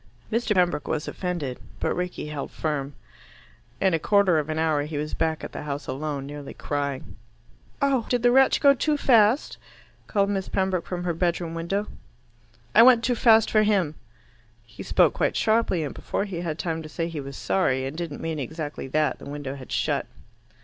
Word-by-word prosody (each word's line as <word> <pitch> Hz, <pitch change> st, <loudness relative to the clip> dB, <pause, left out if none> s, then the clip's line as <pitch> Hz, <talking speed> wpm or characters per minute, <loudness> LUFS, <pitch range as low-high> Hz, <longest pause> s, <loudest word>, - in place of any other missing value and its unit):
Mr. 220 Hz, -1 st, +1 dB
Pembroke 175 Hz, -5 st, +1 dB
was 155 Hz, -1 st, -2 dB
offended, 170 Hz, -9 st, -3 dB, 0.2 s
but -, -, 0 dB
Rickie 180 Hz, -4 st, -4 dB
held 150 Hz, -2 st, -5 dB
firm. 145 Hz, -3 st, -3 dB, 0.8 s
In 190 Hz, -2 st, +2 dB
a 165 Hz, -, +2 dB
quarter 195 Hz, -3 st, +3 dB
of 150 Hz, 0 st, -4 dB
an 155 Hz, -, -2 dB
hour 160 Hz, -2 st, +2 dB
he 150 Hz, +1 st, -4 dB
was 150 Hz, +1 st, -3 dB
back 160 Hz, -1 st, -1 dB
at -, -, -6 dB
the -, -, -6 dB
house 145 Hz, -1 st, -4 dB
alone, 140 Hz, +1 st, -4 dB
nearly 145 Hz, 0 st, -8 dB
crying. 140 Hz, -2 st, -4 dB, 0.7 s
"Oh, 270 Hz, -5 st, +2 dB
did 245 Hz, -2 st, +1 dB
the 245 Hz, -, +5 dB
wretch 265 Hz, +1 st, +4 dB
go 280 Hz, -1 st, +7 dB
too 295 Hz, +2 st, 0 dB
fast?" 235 Hz, -1 st, +3 dB, 0.5 s
called 200 Hz, -1 st, +1 dB
Miss 195 Hz, -2 st, -2 dB
Pembroke 190 Hz, -2 st, 0 dB
from 175 Hz, -1 st, -4 dB
her 175 Hz, -1 st, 0 dB
bedroom 170 Hz, 0 st, -1 dB
window. 170 Hz, +5 st, -2 dB, 0.9 s
"I 225 Hz, -, +8 dB
went 240 Hz, -1 st, +7 dB
too 245 Hz, -, +2 dB
fast 225 Hz, -2 st, +5 dB
for 215 Hz, -, +5 dB
him." 200 Hz, -8 st, +2 dB, 0.7 s
He 110 Hz, -, -12 dB
spoke -, -, +3 dB
quite -, -, 0 dB
sharply, 215 Hz, -6 st, +2 dB
and 145 Hz, -, -4 dB
before 200 Hz, -, -3 dB
he 180 Hz, -4 st, -5 dB
had 160 Hz, -3 st, -3 dB
time 165 Hz, -2 st, -2 dB
to 155 Hz, -, -9 dB
say 165 Hz, +2 st, -3 dB
he 165 Hz, -3 st, -5 dB
was 135 Hz, 0 st, -8 dB
sorry 130 Hz, -9 st, +1 dB
and 135 Hz, +3 st, -5 dB
didn't 165 Hz, -3 st, -5 dB
mean 160 Hz, -2 st, -3 dB
exactly 150 Hz, 0 st, -5 dB
that, 150 Hz, +3 st, 0 dB
the -, -, -9 dB
window 145 Hz, -2 st, -5 dB
had 135 Hz, -2 st, -10 dB
shut. -, -, 0 dB
165 Hz, 190 wpm, -25 LUFS, 150-205 Hz, 0.9 s, I